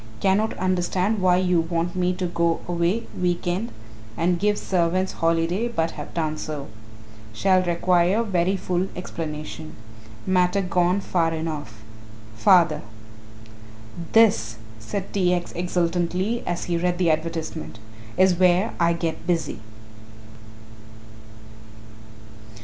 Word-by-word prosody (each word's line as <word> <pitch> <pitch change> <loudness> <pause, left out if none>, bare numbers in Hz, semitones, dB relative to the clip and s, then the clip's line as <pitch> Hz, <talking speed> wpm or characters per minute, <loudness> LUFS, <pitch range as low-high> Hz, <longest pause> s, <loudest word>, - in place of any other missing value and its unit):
Cannot 205 +3 +1
understand 185 +3 0
why 180 -1 +4
you 180 -2 +2
want 170 +1 -2
me 180 0 +1
to 185 0 -2
go 170 -1 0
away 175 +6 0
week 175 -1 -1
end 185 +7 -1 0.5
and 175 +1 +1
give 205 +2 +2
servants 185 +1 0
holiday 165 +6 0
but 165 -9 -1
have 150 - -8
done 155 -2 -1
so. 150 -4 -5 0.6
Shall 185 - +3
require 180 +3 +2
very 190 -2 +1
full 180 0 -1
explanation. 155 -3 -6 0.5
Matter 185 +1 +2
gone 180 +2 +1
far 170 -3 +1
enough. 150 -9 -5 0.5
Father. 165 - +4 1.3
"This," 110 - +4 0.2
said 190 - -5
T. 180 -2 +2
X. 175 -1 -4
exultantly, 180 +5 -1
as 175 0 -2
he 175 -1 -1
read 175 +1 0
the 175 -3 +3
advertisement, 160 -4 -3 0.4
"is 185 0 +5
where 185 +4 +3
I 170 0 +3
get 165 0 -4
busy." 165 -10 -1
175 Hz, 115 wpm, -24 LUFS, 165-185 Hz, 1.3 s, is